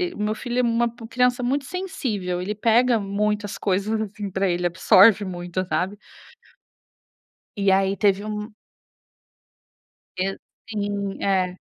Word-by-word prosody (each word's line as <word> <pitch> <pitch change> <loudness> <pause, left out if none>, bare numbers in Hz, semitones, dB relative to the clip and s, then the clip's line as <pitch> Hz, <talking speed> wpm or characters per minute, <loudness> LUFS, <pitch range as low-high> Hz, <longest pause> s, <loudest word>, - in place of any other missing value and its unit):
o - - -11
meu 215 +1 0
filho 245 +2 -3
é - - +5
uma 235 0 +2 0.2
criança 250 +1 +2
muito 270 +2 0
sensível, 220 - -3
ele 205 +3 -3
pega 235 +3 +3
muitas 205 0 -2
coisas, 200 +3 0
assim, 205 -2 -5
pra 190 0 0
ele, 175 0 -1
absorve 195 +4 +5
muito, 180 0 -4
sabe. 190 +3 -1 1.6
E 200 -1 +2
aí 195 +1 +2
teve 200 -1 +2
um 210 +1 -5 1.7
E 195 +1 -1 0.3
sim, 205 -2 -3
é. 185 -2 +1
205 Hz, 130 wpm, -23 LUFS, 190-225 Hz, 1.7 s, é